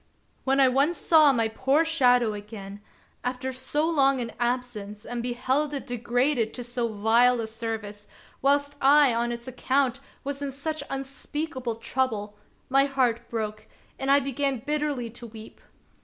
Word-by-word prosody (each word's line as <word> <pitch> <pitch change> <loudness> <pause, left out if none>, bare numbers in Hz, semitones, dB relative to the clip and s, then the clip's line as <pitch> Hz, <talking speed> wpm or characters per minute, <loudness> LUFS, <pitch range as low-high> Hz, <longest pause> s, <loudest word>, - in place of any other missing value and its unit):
When 270 +1 +2
I 270 - +7
once 275 +7 +2
saw 310 -3 +6
my 230 -4 +1
poor 270 +8 +1
shadow 250 -8 +3
again, 205 -1 -9 0.4
after 255 +1 -3
so 265 +4 -1
long 275 -5 +3
an 235 -2 -4
absence, 240 -4 -3
and 240 0 -4
beheld 260 +5 -1
it 275 - -5
degraded 245 0 0
to 245 - -5
so 240 0 -2
vile 230 +3 +3
a 225 - -1
service, 220 -2 -6 0.3
whilst 285 +1 +2
I 280 -1 +6
on 235 +1 0
its 235 +1 -6
account 260 0 0 0.2
was 280 0 -4
in 280 -1 -3
such 310 +4 -4
unspeakable 270 -1 -4
trouble, 225 -3 -2 0.3
my 275 +1 +4
heart 245 -4 0
broke, 215 -2 -4 0.3
and 270 - -2
I 280 +1 +6
began 275 0 -1
bitterly 295 -6 -1
to 235 +1 -9
weep. 220 0 -12
250 Hz, 155 wpm, -26 LUFS, 230-275 Hz, 0.4 s, I